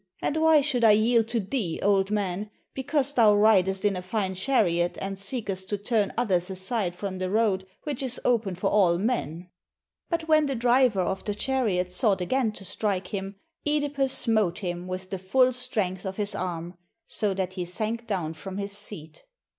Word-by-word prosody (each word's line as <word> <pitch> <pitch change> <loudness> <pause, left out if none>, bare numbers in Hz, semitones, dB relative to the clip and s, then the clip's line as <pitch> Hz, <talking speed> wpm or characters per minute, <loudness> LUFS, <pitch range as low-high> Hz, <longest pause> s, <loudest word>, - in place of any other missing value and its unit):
and 295 - -1
why 315 -1 +5
should 270 -4 0
I 220 -2 +7
yield 225 +1 +3
to 235 0 0
thee, 195 -5 -3
old 195 -1 +3
man, 205 -1 -2 0.2
because 280 +1 0
thou 220 -5 +5
ridest 195 -2 +3
in 205 -1 +2
a 180 - -4
fine 190 +1 -2
chariot 185 -5 +1
and 195 0 -4
seekest 195 -3 -3
to 205 - -1
turn 205 -1 0
others 190 -7 +1
aside 190 0 0
from 190 0 -5
the 185 0 -2
road 200 -3 +1 0.2
which 290 -4 -4
is 255 -2 -2
open 225 -6 +1
for 180 - -1
all 180 -5 +4
men? 180 - -2 0.3
" - - -58
But 335 -2 -2
when 310 -2 +4
the 275 - -2
driver 240 -3 +3
of 190 +2 -3
the 205 - -2
chariot 210 -8 0
sought 195 +1 +2
again 225 +6 0
to 195 - -8
strike 190 -1 -2
him, 195 0 -4 0.3
(Edipus 290 -2 0
smote 215 -9 +1
him 175 -2 -4
with 185 +1 -6
the 190 - -3
full 255 +7 +3
strength 200 -7 -2
of 190 -1 -5
his 210 -1 -2
arm, 175 -1 -5 0.3
so 205 -3 +1
that 185 -1 -2
he 180 -2 -4
sank 225 +6 -2
down 175 -6 -2
from 190 +4 -8
his 200 0 -4
seat. 185 -7 -7
205 Hz, 190 wpm, -26 LUFS, 185-235 Hz, 0.3 s, I